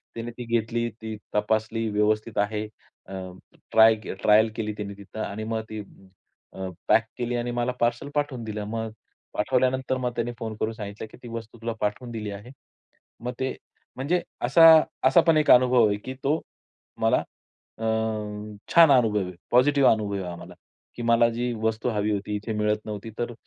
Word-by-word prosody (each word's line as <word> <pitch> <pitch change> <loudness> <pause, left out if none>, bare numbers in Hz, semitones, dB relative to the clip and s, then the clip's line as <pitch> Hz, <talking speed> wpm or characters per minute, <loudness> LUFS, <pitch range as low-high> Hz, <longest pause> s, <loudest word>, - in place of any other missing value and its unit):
त्याने 115 +1 -5
ती 125 - -6
घेतली, 115 +1 -2
ती 110 -1 -7 0.2
तपासली 110 +2 0
व्यवस्थित 105 +1 0
आहे. 105 +1 -1 1.0
ट्राय 110 0 +7
अ, - - -2
ट्रायल 110 +1 +5
केली 105 -2 -2
त्यांनी 105 -1 -6
तिथं 100 +2 -10
आणि 105 +2 -5
मग 110 - -1
ती 110 -1 -5 0.7
अ, 95 0 -4 0.2
पॅक 115 - +5
केली 120 0 -2
आणि 120 0 -2
मला 120 +1 0
पार्सल 120 +4 0
पाठवून 145 -5 -1
दिलं. 105 -1 -4
मग 110 0 -3 0.4
पाठवल्यानंतर 130 +3 +1
मग 125 -1 -1
त्याने 120 +1 -1
फोन 110 -1 -4
करून 110 +1 -1
सांगितलं, 105 -1 -7
की - - -13
"ती - - -8
वस्तू 115 0 -7
तुला 115 0 -2
पाठवून 105 +4 -2
दिली 105 -3 -4
आहे." 105 +4 -9 0.8
मग 125 - -2
ते 130 0 0 0.4
म्हणजे 155 +8 0 0.3
असा 165 - +6 0.4
असा 135 +6 +6
पण 165 -2 +5
एक 155 - +2
अनुभव 125 -2 +6
आहे, 100 - 0
की 130 +5 -7
तो 150 +4 +2 0.6
मला 115 0 +3 0.6
अ, 115 - -5 0.9
छान 165 -2 +8
अनुभव 110 -5 +3
आहे. 90 - -7 0.2
पॉझिटिव्ह 135 +2 +5
अनुभव 105 -2 -2
आहे 95 - -3
हा 90 -1 -6
मला, - - -13 0.4
की 120 - -5
मला 115 0 +4
जी 120 +1 -2
वस्तू 110 +2 0
हवी 105 -1 0
होती, 105 +1 -2
इथे 105 +2 -4
मिळत 105 0 0
नव्हती. 105 +1 -6
तर 120 0 -2
115 Hz, 175 wpm, -25 LUFS, 105-125 Hz, 1.0 s, छान